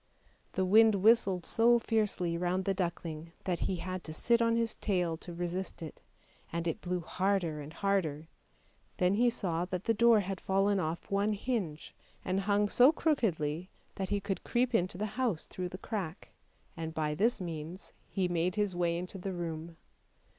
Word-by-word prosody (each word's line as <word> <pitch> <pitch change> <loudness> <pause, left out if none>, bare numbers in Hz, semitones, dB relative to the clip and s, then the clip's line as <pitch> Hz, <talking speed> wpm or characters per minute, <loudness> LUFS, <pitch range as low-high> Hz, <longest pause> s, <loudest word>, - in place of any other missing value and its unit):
The 190 - +1
wind 220 +3 +6
whistled 195 -3 +4
so 235 +1 +5
fiercely 210 -7 0
round 180 +2 0
the 195 - +2
duckling 170 -3 -4
that 180 -3 -1
he 190 - -1
had 185 +1 -5
to 155 - -6
sit 235 +8 +2
on 230 0 +3
his 230 -1 +1
tail 180 -5 0
to 175 - -9
resist 175 +1 -4
it, 160 - -9 0.5
and 170 0 -2
it 165 - -2
blew 180 0 -2
harder 180 -3 0
and 145 +1 -8
harder; 165 -5 -1 0.7
then 180 +1 +3
he 240 +4 +4
saw 175 -7 -1
that 180 0 -4
the 225 - +2
door 230 0 +5
had 195 -1 -4
fallen 195 +1 +2
off 165 +1 -3
one 200 +2 +2
hinge 200 -8 -3 0.3
and 185 +1 +1
hung 205 0 +3
so 250 +7 +6
crookedly 185 - 0 0.2
that 190 -1 -4
he 205 0 +1
could 195 -1 -3
creep 245 +1 +1
into 185 -4 +1
the 210 - -1 0.2
house 220 -11 0
through 180 -1 -5
the 185 - -7
crack, 190 -5 -5 0.5
and 160 -1 -5
by 150 -1 0
this 225 +10 +2
means 170 +1 -6 0.2
hejnade 180 -1 +1
his 205 -3 0
way 170 -1 +1
into 180 +2 -6
the 190 +1 -4
room. 165 -1 -5
185 Hz, 175 wpm, -31 LUFS, 170-205 Hz, 0.7 s, wind